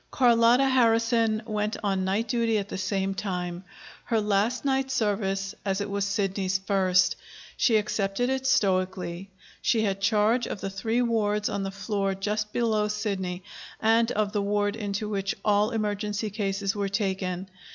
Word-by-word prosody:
Carlotta 240 Hz, +1 st, +4 dB
Harrison 230 Hz, -3 st, +3 dB
went 210 Hz, -1 st, -2 dB
on 195 Hz, -2 st, 0 dB
night 200 Hz, +5 st, 0 dB
duty 230 Hz, -1 st, +1 dB
at 200 Hz, -1 st, -3 dB
the -, -, -4 dB
same 195 Hz, +1 st, -1 dB
time 180 Hz, -2 st, -4 dB, 0.4 s
her 230 Hz, -2 st, +1 dB
last 210 Hz, +5 st, 0 dB
night 270 Hz, -1 st, +1 dB
service, 200 Hz, -5 st, -1 dB
as 195 Hz, -1 st, -1 dB
it 205 Hz, -, -2 dB
was 200 Hz, 0 st, 0 dB
Sidney's 195 Hz, -2 st, 0 dB
first. 185 Hz, -2 st, +2 dB, 0.4 s
She 225 Hz, -3 st, +3 dB
accepted 210 Hz, +2 st, -1 dB
it 265 Hz, 0 st, -1 dB
stoically. 185 Hz, -4 st, 0 dB, 0.3 s
She 225 Hz, -2 st, +2 dB
had 195 Hz, -2 st, -1 dB
charge 215 Hz, +4 st, +2 dB
of -, -, -5 dB
the 195 Hz, -, -4 dB
three 225 Hz, +5 st, 0 dB
wards 210 Hz, -3 st, +1 dB
on 200 Hz, -, -2 dB
the 195 Hz, -, -2 dB
floor 195 Hz, 0 st, -2 dB
just 210 Hz, +2 st, -2 dB
below 220 Hz, -3 st, +1 dB
Sidney, 195 Hz, -4 st, -3 dB, 0.4 s
and 225 Hz, +1 st, +3 dB
of 210 Hz, -1 st, 0 dB
the 205 Hz, -1 st, 0 dB
ward 205 Hz, 0 st, 0 dB
into 210 Hz, -1 st, -3 dB
which 195 Hz, -2 st, -2 dB
all 210 Hz, 0 st, +3 dB
emergency 210 Hz, -1 st, -2 dB
cases 200 Hz, -1 st, -1 dB
were 200 Hz, -1 st, -1 dB
taken. 190 Hz, -2 st, -2 dB
205 Hz, 160 wpm, -26 LUFS, 195-225 Hz, 0.4 s, Carlotta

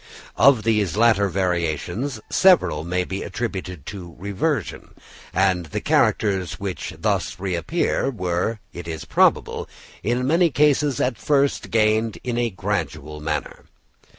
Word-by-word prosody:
Of 130 Hz, -5 st, +6 dB
these 105 Hz, -4 st, +1 dB
latter 110 Hz, -3 st, +4 dB
variations 90 Hz, -, -1 dB
several 180 Hz, -, +4 dB
may 90 Hz, +2 st, -1 dB
be 95 Hz, +2 st, -5 dB
attributed 90 Hz, -, -5 dB
to 90 Hz, -5 st, -8 dB
reversion; 100 Hz, -, -3 dB, 0.4 s
and 95 Hz, -2 st, +1 dB
the -, -, -3 dB
characters 95 Hz, -5 st, +1 dB
which 95 Hz, -3 st, -5 dB
thus -, -, -1 dB
reappear 100 Hz, -, -1 dB
were, 95 Hz, -1 st, -2 dB
it 85 Hz, -1 st, -8 dB
is 80 Hz, -1 st, -5 dB
probable, -, -, +2 dB, 0.3 s
in 120 Hz, +5 st, 0 dB
many 165 Hz, +5 st, +3 dB
cases 145 Hz, -2 st, +2 dB
at 125 Hz, -3 st, 0 dB
first 140 Hz, +3 st, +1 dB
gained 110 Hz, 0 st, +2 dB
in 125 Hz, -2 st, -2 dB
a 120 Hz, -1 st, +1 dB
gradual 85 Hz, -7 st, -3 dB
manner. 75 Hz, -2 st, -4 dB
100 Hz, 125 wpm, -22 LUFS, 90-120 Hz, 0.4 s, Of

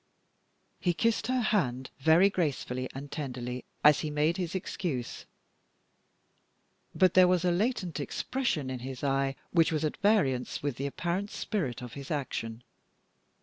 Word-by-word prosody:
He 175 Hz, -2 st, +1 dB
kissed 225 Hz, +2 st, +1 dB
her 255 Hz, 0 st, +1 dB
hand 130 Hz, -, 0 dB
very 160 Hz, +7 st, +6 dB
gracefully 130 Hz, -7 st, -1 dB
and 140 Hz, +2 st, -8 dB
tenderly 125 Hz, -4 st, -4 dB, 0.2 s
as 150 Hz, -1 st, +7 dB
he 155 Hz, -, -2 dB
made 150 Hz, +4 st, +1 dB
his 180 Hz, -1 st, -3 dB
excuse; 170 Hz, -9 st, -4 dB, 1.7 s
but 185 Hz, -2 st, +4 dB
there 185 Hz, -1 st, +7 dB
was 180 Hz, -1 st, +2 dB
a 180 Hz, -, +3 dB
latent 185 Hz, -, 0 dB
expression 155 Hz, -, -2 dB
in 130 Hz, -, -4 dB
his 130 Hz, +1 st, -7 dB
eye 135 Hz, -1 st, +1 dB, 0.2 s
which 165 Hz, -2 st, +4 dB
was 155 Hz, -1 st, 0 dB
at 150 Hz, -, -2 dB
variance 185 Hz, -, +1 dB
with 145 Hz, -4 st, -2 dB
the 140 Hz, -, -2 dB
apparent 175 Hz, +7 st, -2 dB
spirit 140 Hz, -, -3 dB
of 120 Hz, -, -8 dB
his 140 Hz, -1 st, -8 dB
action. 120 Hz, -6 st, -3 dB
150 Hz, 145 wpm, -30 LUFS, 130-185 Hz, 1.7 s, as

